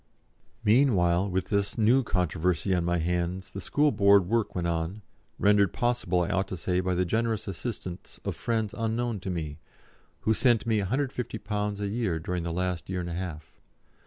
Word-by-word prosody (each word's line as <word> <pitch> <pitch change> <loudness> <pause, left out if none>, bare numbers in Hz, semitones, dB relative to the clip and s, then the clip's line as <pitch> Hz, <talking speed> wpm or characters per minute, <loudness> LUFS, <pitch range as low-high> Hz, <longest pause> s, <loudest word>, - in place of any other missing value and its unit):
'" - - -38
Meanwhile, 100 -6 +3
with 95 -1 -2
this 100 -1 0
new 115 +4 +4
controversy 90 - 0
on 90 -2 +1
my 85 +1 +1
hands, 90 +2 -2
the 95 - -6
School 150 +9 +2
Board 100 -4 +5
work 115 +1 0
went 90 -1 -1
on, 85 +5 -2 0.3
rendered 100 -2 +4
possible, 120 -8 +1
I 85 - -1
ought 95 -1 +1
to 95 - -5
say, 90 +2 0
by 90 0 0
the 90 +1 +1
generous 110 +3 0
assistance 95 -2 -6
of - - -2
friends 110 -3 -1
unknown 115 -1 -1
to 95 - -5
me, 80 -4 -4 0.6
who 110 - +2
sent 120 -1 +3
me, 110 -2 +2
£150 105 -3 -2
a 100 - -1
year 105 -5 -1
during 90 +2 -3
the 85 0 -3
last 90 -1 -2
year 95 -1 -2
and 85 0 -5
a - - -3
half. 85 -3 -6
95 Hz, 185 wpm, -28 LUFS, 90-110 Hz, 0.6 s, Board